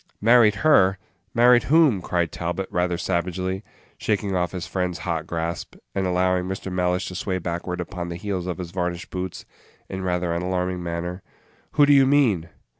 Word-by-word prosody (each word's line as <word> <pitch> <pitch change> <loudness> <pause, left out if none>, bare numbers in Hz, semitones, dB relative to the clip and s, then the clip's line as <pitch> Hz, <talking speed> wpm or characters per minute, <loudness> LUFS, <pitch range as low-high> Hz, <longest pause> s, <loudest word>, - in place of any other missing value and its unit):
"Married 115 -1 +5
her! 100 -11 +5 0.4
Married 120 +1 +6
whom?" 150 - +4
cried 85 -2 -1
Talbot, 85 +3 -3
rather 90 0 0
savagely, 95 +2 -2 0.4
shaking 100 -2 0
off 90 -1 0
his 90 -3 -5
friend's 90 -1 -2
hot 85 -2 -2
grasp, 85 0 -4 0.2
and 95 -1 0
allowing 90 0 +1
Mr. 95 0 -5
Mellish 90 +1 0
to - - -8
sway 95 +1 -2
backward 90 +1 -4
upon 85 0 -5
the 85 - -4
heels 90 -1 -3
of 90 -3 -3
his 90 -2 -6
varnished 90 -1 -3
boots 90 -1 -5 0.4
in 95 - -4
rather 90 -2 -1
an 85 - -1
alarming 90 0 -1
manner. 85 +2 -4 0.5
"Who 145 - +6
do 145 - +5
you 135 -1 +6
mean?" 115 - +3
90 Hz, 175 wpm, -24 LUFS, 85-95 Hz, 0.5 s, Married